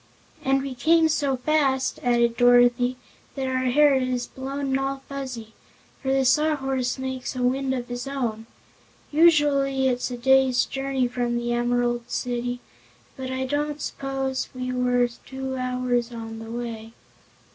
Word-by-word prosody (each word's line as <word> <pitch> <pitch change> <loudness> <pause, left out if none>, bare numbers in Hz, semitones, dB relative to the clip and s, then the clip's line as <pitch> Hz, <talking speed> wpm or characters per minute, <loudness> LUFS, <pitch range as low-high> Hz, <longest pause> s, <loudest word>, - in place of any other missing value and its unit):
"And 270 0 +2
we 275 -1 -4
came 320 +6 +4
so 285 -3 0
fast," 270 -1 +1
added 235 -1 +2
Dorothy, 245 +1 +4 0.4
"that 270 -1 -2
our 260 0 -1
hair 290 +3 +5
is 255 -2 0
blown 270 +1 -3
all 270 0 -2
fuzzy, 255 -6 -6 0.5
for 265 - -1
the 270 0 +2
Sawhorse 270 -2 +1
makes 260 0 -4
a 250 - -2
wind 265 +2 +1
of 245 -1 -4
his 245 +2 -5
own. 235 -5 -3 0.6
Usually 290 -4 +4
it's 250 0 0
a 245 - -5
day's 265 0 +4
journey 270 -2 -1
from 240 -1 -1
the 240 0 -1
Em'rald 240 0 0
City, 245 0 -2 0.5
but 260 -2 -5
I 260 0 -2
don't 295 +2 -2
s'pose 270 -2 -3
we 255 0 -3
were 250 -1 +2 0.2
two 265 0 -5
hours 250 -1 -1
on 225 -1 -7
the 225 0 -9
way." 230 -1 -6
255 Hz, 145 wpm, -24 LUFS, 245-270 Hz, 0.6 s, hair